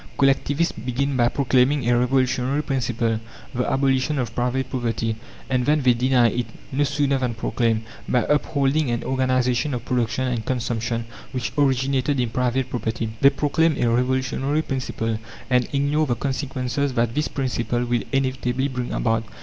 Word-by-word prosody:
Collectivists 140 +4 +2
begin 130 +4 -1
by 120 -1 +3
proclaiming 135 0 +2
a 120 - +4
revolutionary 130 +3 +1
principle 120 -5 0 0.3
the 125 +1 -1
abolition 135 +2 +1
of 120 -4 -2
private 125 +2 -1
property 115 -3 -2 0.3
and 130 -1 0
then 150 -1 +3
they 125 -1 +5
deny 125 0 +3
it, 120 +2 -2 0.2
no 140 +2 +1
sooner 140 -1 +1
than 125 -3 -1
proclaimed, 115 -1 0 0.3
by 125 - +3
upholding 145 -1 +1
an 120 0 -1
organization 130 +1 +1
of 120 0 -6
production 125 0 0
and 120 -3 -1
consumption 115 -2 -2 0.3
which 125 -2 -3
originated 135 -1 +1
in 120 -2 0
private 125 +1 0
property. 115 -1 -3
They 140 - +8
proclaim 150 +2 +1
a 120 - +2
revolutionary 130 +4 0
principle, 115 -5 -2 0.3
and 125 -1 +3
ignore 145 +2 +1
the 120 - +1
consequences 135 0 -2
that 115 -1 +1
this 150 +3 0
principle 125 -2 -1
will 120 -1 0
inevitably 130 0 0
bring 125 -2 -4
about. 115 -1 +1
130 Hz, 155 wpm, -23 LUFS, 120-135 Hz, 0.3 s, They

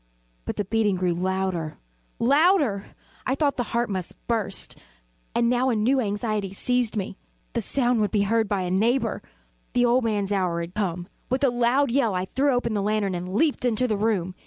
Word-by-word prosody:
But - - -3
the 205 - -2
beating 210 -1 +1
grew 180 -1 0
louder, 185 -3 -2 0.4
louder! 280 - +3 0.4
I 260 - +2
thought 285 -1 +1
the 245 - 0
heart 235 +1 0
must 185 -3 -4
burst. 220 -5 -2 0.6
And 235 0 +3
now 250 +2 +2
a 240 - +1
new 245 +6 +2
anxiety 205 -2 -2
seized 245 +1 0
me 195 -1 -3 0.4
the 235 - 0
sound 245 0 +1
would 210 - +1
be 205 -2 +2
heard 220 +1 +1
by 200 -2 0
a 180 - -2
neighbour! 225 +4 +1 0.5
The 245 0 +3
old 245 +1 +3
man's 205 -3 0
hour 180 -4 0
had 170 +1 -6
come! 180 -4 -2 0.2
With 260 +2 0
a 270 - +4
loud 245 +3 +2
yell, 235 -6 +2
I 180 0 -1
threw 275 +8 +1
open 245 -3 0
the 205 - 0
lantern 205 -1 0
and 180 +2 -4
leaped 300 +1 +2
into 245 0 +1
the 215 - 0
room. 200 -4 0
215 Hz, 195 wpm, -25 LUFS, 195-245 Hz, 0.6 s, a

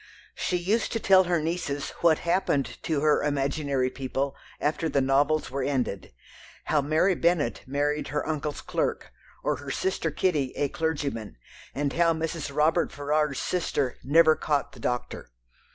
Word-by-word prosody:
She 180 - -1
used 200 +6 0
to 225 - 0
tell 190 -2 +5
her 175 -1 +1
nieces 155 -3 -2
what 165 -2 +5
happened 170 -5 0
to 155 -3 -1
her 150 0 +3
imaginary 140 -2 0
people 135 +1 -3 0.2
after 160 +2 0
the 140 - +2
novels 140 +3 +2
were 140 +1 -2
ended, 130 -8 -2 0.5
how 150 - +2
Mary 155 +7 +2
Bennet 170 -8 +1
married 145 +2 -1
her 150 0 -2
uncle's 150 -2 -3
clerk, - - -2 0.3
or 150 - 0
her 140 0 -8
sister 175 +2 -1
Kitty 150 -4 0
a 145 - 0
clergyman, 145 -10 -3 0.4
and 140 0 -1
how 165 0 +3
Mrs. 160 -2 -3
Robert 155 +4 +2
Ferrars's 145 -1 0
sister 145 -7 -1
"never 155 +3 +5
caught 145 -2 -1
the 125 - -14
doctor." 125 - -3
150 Hz, 150 wpm, -27 LUFS, 140-165 Hz, 0.5 s, tell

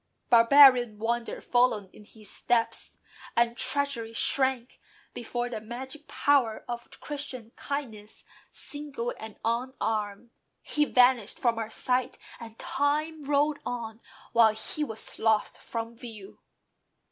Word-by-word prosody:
Barbarian 245 -1 +7
wonder 235 +2 -2
followed 245 -6 +1
in 210 - -15
his 215 -1 -15
steps; 230 +2 -1 0.4
And 235 0 +3
treachery 270 -5 -1
shrank 260 0 +1 0.3
before 240 +1 -3
the 230 -3 -5
magic 260 +6 -8
power 270 -6 +1
Of 240 -1 -6
Christian 260 -6 -6
kindness, 225 -7 -6 0.2
single 285 -5 -4
and 220 -1 -8
unarmed. 230 -2 -2 0.3
He 300 0 +1
vanished 250 -5 +3
from 235 -2 +1
our 220 -1 -4
sight, 250 +2 0 0.2
and 225 -1 -10
time 300 +3 -1
rolled 290 +1 +1
on 230 -2 -5 0.3
While 225 -2 +5
he 260 +7 -3
was 220 -6 -5
lost 220 -1 +1
from 230 0 -5
view. 225 -5 -10
240 Hz, 120 wpm, -28 LUFS, 225-265 Hz, 0.4 s, Barbarian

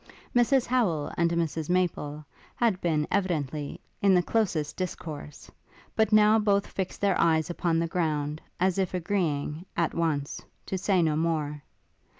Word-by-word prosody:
Mrs 245 +1 +4
Howel 200 -13 +1
and 170 0 +2
Mrs 165 -2 -1
Maple 155 -5 -1 0.3
had 220 -6 +1
been, 155 -3 +1
evidently, 155 -7 -1 0.2
in 195 -1 +5
the 180 - +4
closest 170 -9 0
discourse, 155 -5 -6 0.4
but 220 -1 +2
now 215 +1 +6
both 200 -1 +2
fixed 190 -1 -4
their 200 -2 +2
eyes 160 0 +2
upon 170 -1 0
the 165 - +1
ground, 155 -3 -1 0.2
as 185 +1 +2
if 185 -1 0
agreeing, 165 -4 -1
at 170 -2 +1
once, 150 -4 -1 0.2
to - - -3
say 190 -1 +2
no 155 -2 +2
more. 155 -2 -1
170 Hz, 150 wpm, -27 LUFS, 155-195 Hz, 0.4 s, now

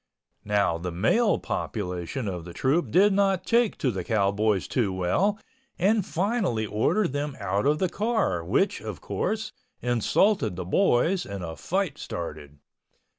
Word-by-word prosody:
Now 100 -5 +1
the 90 +1 -4
male 155 - +2
population 95 +4 -4
of 90 -3 -4
the 85 0 -9
troupe 145 - +1
did 195 +3 +5
not 195 -2 +2
take 235 -2 +2
to 130 - 0
the 95 -4 -4
cowboys 105 -1 +1
too 115 -7 0
well 95 - +1 0.4
and 205 +3 +3
finally 185 - 0
ordered 130 - +1
them 145 0 -3
out 100 +4 0
of 150 +1 +3
the 185 - +1
car 205 - 0
which, - - +1
of - - -6
course, - - -3 0.3
insulted 120 - +2
the 90 0 -5
boys 175 - +2
and 100 -2 -6
a 80 -1 -5
fight 185 - -2
started. 75 -3 -6
120 Hz, 150 wpm, -26 LUFS, -, 0.4 s, did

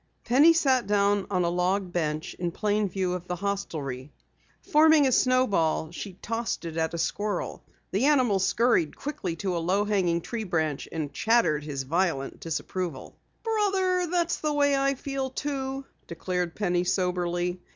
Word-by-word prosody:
Penny 280 +7 +6
sat 265 -9 +2
down 205 -1 +2
on 185 -3 +1
a 170 - +1
log 180 +1 0
bench 155 -1 -2
in 175 -1 -1
plain 210 +3 0
view 185 -1 -1
of 180 0 -5
the 180 - -2
hostelry. 155 -9 -4 0.5
Forming 310 -1 +5
a 260 - +3
snowball, 205 -12 +2
she 190 +2 -7
tossed 225 +2 -3
it 165 -1 -5
at 160 0 -1
a - - -3
squirrel. 205 +3 -2 0.3
The 205 +7 +1
animal 255 -9 +3
scurried 190 -5 +2
quickly 280 - -4
to 185 +1 -2
a - - 0
low 190 +5 +1
hanging 180 -5 +1
tree 220 +6 -4
branch 160 -6 -2
and 150 -4 -4
chattered 220 -8 +2
his 140 -3 -4
violent 160 -2 -1
disapproval. 165 -2 -4 0.3
"Brother, 385 -5 +1
that's 345 -1 +1
the 305 -1 -1
way 285 -1 +3
I 275 0 +1
feel, 270 0 -3
too," 270 0 -4 0.2
declared 175 0 -3
Penny 180 -4 0
soberly. 180 -1 -1
195 Hz, 160 wpm, -27 LUFS, 170-260 Hz, 0.5 s, Penny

